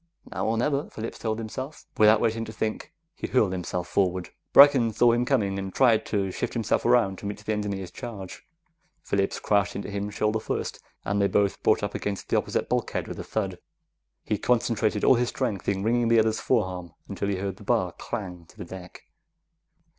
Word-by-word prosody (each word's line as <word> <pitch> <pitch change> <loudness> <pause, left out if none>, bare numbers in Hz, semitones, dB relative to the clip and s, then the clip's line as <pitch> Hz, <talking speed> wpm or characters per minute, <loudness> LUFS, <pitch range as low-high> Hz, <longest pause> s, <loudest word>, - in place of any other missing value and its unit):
Now - - -2
or 115 +1 +1
never, 140 +4 0
Phillips 110 +1 -6
told 110 -1 -2
himself. 130 +6 -6
Without 110 0 +6
waiting 115 0 0
to 110 - -8
think, 110 0 -3 0.2
he - - -5
hurled 110 -7 +2
himself 90 -1 -3
forward. 90 -2 0 0.2
Brecken 135 -5 +7
saw 120 +2 +5
him 120 +1 +1
coming, 100 -8 +1
and 95 0 -5
tried 115 -1 +3
to 100 -3 -1
shift - - -3
around 115 -3 +2
to 100 - -6
meet 105 - -4
the 110 - 0
engineer's 100 -3 -3
charge. 105 -4 -8 0.6
Phillips 100 -1 0
crashed 100 -1 +1
into 100 - -5
him 100 +1 -3
shoulder 105 +1 0
first, - - -3 0.3
and 100 +1 0
they 100 - +4
both 100 0 +1
brought - - +3
up - - -2
against 100 -1 -4
the - - +1
opposite - - -1
bulkhead - - -1
with - - -7
a - - -4
thud. 95 -5 -3 0.6
He 105 - -1
concentrated 115 -3 +1
all - - +7
his 120 -1 +1
strength 110 -8 -2
into 95 -1 -1
wringing 120 +2 +2
the 115 0 +4
other's 110 0 +3
forearm 90 -8 -1
until 100 0 -3
he 100 - 0
heard 95 0 -4
the - - -13
bar - - +1
clang 90 -3 -6
to - - -20
the - - -7
deck. 90 +1 -10
105 Hz, 195 wpm, -26 LUFS, 95-115 Hz, 0.6 s, Brecken